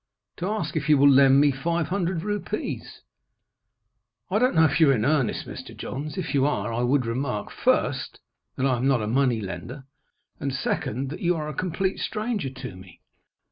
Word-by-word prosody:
"To 180 - -3
ask 195 -8 -2
if 155 0 -2
you 150 - +6
will 140 +1 +6
lend 135 0 +6
me 145 0 +5
five 160 +3 -1
hundred 180 -3 -1
rupees." 205 0 -4 1.3
"I 210 - +3
don't 250 -4 +2
know 160 0 +6
if 145 - +1
you 160 -3 +6
are 135 - +5
in 110 -1 0
earnest, 145 -5 +1
Mr. - - -9
Johns. 145 +3 -5
If 170 -4 -3
you 140 -2 +3
are, 115 -6 -1
I 120 - -1
would 125 +1 +2
remark, 115 -2 -3
first, - - 0 0.4
that 130 - -1
I 130 -2 +2
am 125 +3 0
not 130 -5 +2
a - - -2
money 125 -1 +2
lender; 100 +8 -7 0.6
and, 140 - -2
second, 130 0 -2
that 160 - -7
you 175 0 +2
are 155 -2 -3
a 150 - -4
complete 185 +4 -2
stranger 215 - -2
to 130 -6 -8
me." 95 -2 -14
140 Hz, 195 wpm, -25 LUFS, 125-170 Hz, 1.3 s, you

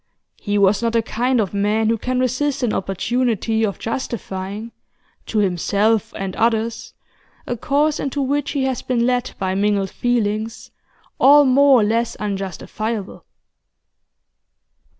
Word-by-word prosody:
He 205 -1 -1
was 200 +1 +3
not 230 -1 0
the 230 -1 +2
kind 245 +3 0
of 205 -4 -1
man 210 +2 +1
who 230 - +2
can 255 +2 -1
resist 260 +2 0
an 230 - +1
opportunity 225 +3 0
of 200 -3 -1
justifying, 215 -3 -5 0.6
to 220 - -3
himself 205 +3 +1
and 195 -1 -4
others, 225 0 -1 0.5
a 245 - -3
course 290 +6 +1
into 280 +1 -3
which 285 +2 -1
he 280 -2 0
has 265 -1 -1
been 240 -2 0
led 250 0 0
by 190 -1 -1
mingled 200 -1 0
feelings, 225 -2 -2 0.5
all 290 +1 +7
more 270 -1 +5
or - - +3
less 230 +2 0
unjustifiable. 205 +1 -4
225 Hz, 135 wpm, -20 LUFS, 205-255 Hz, 0.6 s, all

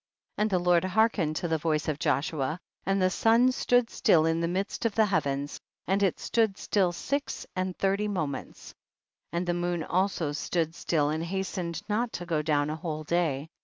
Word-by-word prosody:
64. - - +1
And 215 - +3
the 185 -3 +2
Lord 175 -1 +5
hearkened 185 -5 +2
to 175 - -2
the 160 -1 0
voice 155 -1 0
of 150 -2 -1
Joshua, 150 0 0 0.3
and 195 0 +2
the 185 0 +3
sun 230 +5 +4
stood 245 -2 +2
still 170 -10 +4
in 165 +1 +1
the 170 - +1
midst 190 +4 -2
of 230 -3 0
the 220 - +5
hea 200 -3 +2
vens, 140 +1 -3 0.3
and 195 +3 +1
it 195 -4 +1
stood 220 -4 +1
still 190 -4 +1
six 280 +11 -3
and 185 0 -2
thirty 195 +2 +1
moments,* 155 -9 -4 0.6
and 170 +1 -1
the 175 - 0
moon 175 -1 -1
also 180 -3 0
stood 160 +2 -1
still 150 -4 0
and 160 +1 -2
hastened 180 -1 -3
not 225 +3 0
to 175 - -5
go 165 -3 0
down 150 -1 +1
a - - -2
whole 155 -1 -4
day. 160 -3 0
175 Hz, 200 wpm, -28 LUFS, 155-195 Hz, 0.6 s, Lord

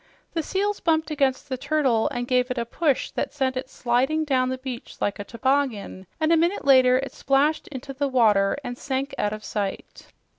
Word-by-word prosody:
The 330 - 0
seals 400 +6 -1
bumped 320 -2 +1
against 275 -3 0
the 260 -2 -4
turtle 275 -6 +1
and 245 0 -4
gave 250 0 +2
it 255 - -3
a 235 - -1
push 285 +4 0
that - - -3
sent 265 -3 -1
it 255 +1 -4
sliding 265 +6 0
down 255 -3 +1
the 260 - -2
beach 255 -2 -7
like 205 - -1
a - - -3
toboggan, 230 -5 -1
and 315 0 +2
a - - +5
minute 340 +1 +1
later 255 -2 +6
it 270 +1 -3
splashed 285 +3 +1
into 275 0 -7
the 285 +1 -1
water 215 -6 +3
and 245 - -5
sank 275 +1 -3
out 205 - +1
of 215 0 -6
sight. 200 -2 -5
265 Hz, 200 wpm, -24 LUFS, 245-290 Hz, -, later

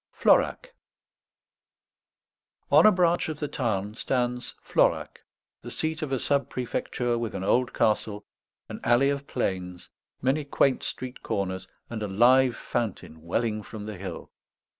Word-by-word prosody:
FLORAC - - +2 2.0
On - - +8
a - - +8
branch 175 -3 +2
of 155 -1 -5
the 150 - -2
Tarn 105 -7 -2
stands 125 +1 -2
Florac, - - +1 0.4
the - - -8
seat 160 +1 -2
of 150 -3 -3
a 135 - +1
sub 140 0 0
prefecture 120 -1 -2
with 115 -2 -3
an 95 - -3
old 125 +5 +2
castle, 105 -1 0 0.4
an - - -7
alley 130 +4 +4
of 140 0 -4
planes, 90 -6 -3 0.3
many 135 +4 +1
quaint 140 -1 +2
street 130 0 -5
corners, 95 -2 -3 0.2
and 115 -2 -5
a 105 - -2
live 120 +5 +4
fountain 105 -11 -4
welling 110 +6 -1
from 105 0 -8
the 105 -2 -6
hill. 95 - -7
120 Hz, 140 wpm, -27 LUFS, 105-135 Hz, 2.0 s, On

